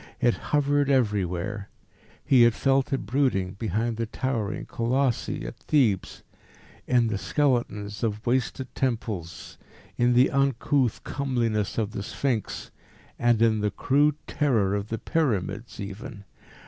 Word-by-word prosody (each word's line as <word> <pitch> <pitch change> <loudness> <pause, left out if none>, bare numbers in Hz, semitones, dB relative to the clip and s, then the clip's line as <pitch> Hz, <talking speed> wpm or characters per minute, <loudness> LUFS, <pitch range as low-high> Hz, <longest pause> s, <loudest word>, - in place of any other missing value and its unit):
It 120 -2 +3 0.2
hovered 145 -1 +2
everywhere. 105 -5 0 0.6
He 130 -3 +5
had 120 -1 +6
felt 135 +1 +2
it 135 - -1
brooding 125 -9 +1
behind 110 +2 -1
the 115 -1 -2
towering 115 -4 -2
Colossi 125 - -1
at - - -7
Thebes, 120 - +1 0.6
in 125 -2 +3
the 110 -3 -1
skeletons 120 -8 0
of 110 -1 -2
wasted 130 0 -1
temples, 110 - -3 0.4
in 120 0 +4
the 125 +2 +5
uncouth 135 -2 +1
comeliness 120 -7 -1
of 110 -2 0
the 100 - -4
Sphinx, 115 +1 -3 0.5
and 120 -1 +3
in 110 -2 +3
the 105 - +1
crude 145 +8 +2
terror 115 -10 +1
of 100 0 -2
the 115 - -3
Pyramids 115 - -1
even. 100 +2 -7
115 Hz, 130 wpm, -26 LUFS, 105-135 Hz, 0.6 s, had